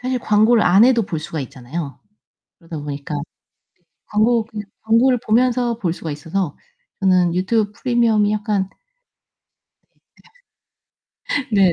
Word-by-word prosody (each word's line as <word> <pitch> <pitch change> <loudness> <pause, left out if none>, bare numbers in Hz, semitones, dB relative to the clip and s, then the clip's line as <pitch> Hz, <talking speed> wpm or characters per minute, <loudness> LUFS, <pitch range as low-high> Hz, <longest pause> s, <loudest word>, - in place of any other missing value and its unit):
사실 255 0 -1
광고를 220 0 +3
안 190 +5 +6
해도 245 -2 +4
볼 165 -4 -4
수가 155 0 -5
있잖아요. 140 +2 -6 0.6
그러다 165 -2 -8
보니까 145 0 -5 0.9
광고 225 +2 +2
그냥 210 -2 -7 0.2
광고를 235 +3 +3
보면서 240 0 +2
볼 175 -6 -1
수가 165 -2 -6
있어서 160 +3 -3 0.4
저는 180 -3 +3
유튜브 205 +3 0
프리미엄이 225 -3 +2
약간 205 -3 -1 2.8
네. 195 -4 +4
205 Hz, 255 characters per minute, -20 LUFS, 170-230 Hz, 2.8 s, 안